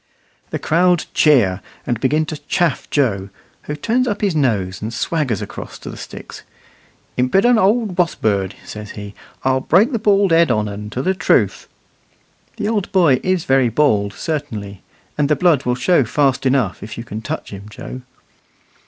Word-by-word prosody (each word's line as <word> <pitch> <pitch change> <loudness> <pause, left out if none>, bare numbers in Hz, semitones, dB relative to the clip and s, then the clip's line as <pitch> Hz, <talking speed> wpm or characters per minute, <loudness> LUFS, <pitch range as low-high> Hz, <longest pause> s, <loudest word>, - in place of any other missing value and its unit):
The - - -2
crowd 175 +2 +2
cheer, 110 -12 +4 0.2
and 120 -2 -1
begin 150 +5 +1
to 155 0 -5
chaff 170 -6 0
Joe, 100 -9 0 0.4
who 150 - -4
turns 235 +11 0
up 205 -3 -2
his 200 -5 +1
nose 100 -10 0
and 110 +2 -4
swaggers 125 - -1
across - - -8
to - - -8
the - - -9
sticks. - - -9 0.8
"Imp'dent 195 - +3
old 215 -1 +2
wosbird!" 100 - 0
says 105 -1 -8
he; 105 0 -7 0.3
"I'll 130 0 +2
break 190 - +3
the 230 - -1
bald 200 -3 +3
head 165 -1 +5
on 105 -3 +1
un 105 +1 -6
to 125 +5 -3
the 190 - +2
truth." 190 - +1 0.9
The 210 -2 -2
old 210 -4 -1
boy 165 -9 +4
is 185 -3 0
very 135 -2 +3
bald, 105 -6 +2
certainly, 110 - -5 0.4
and 145 -1 +2
the 150 - +4
blood 155 -2 +2
will 125 0 +1
show 145 +4 +3
fast 135 +2 +1
enough 130 -7 +1
if 110 - -8
you 115 - -5
can 110 -1 -7
touch 155 +7 -5
him, 100 +1 -9
Joe. 125 +4 -8
140 Hz, 170 wpm, -19 LUFS, 110-175 Hz, 0.9 s, head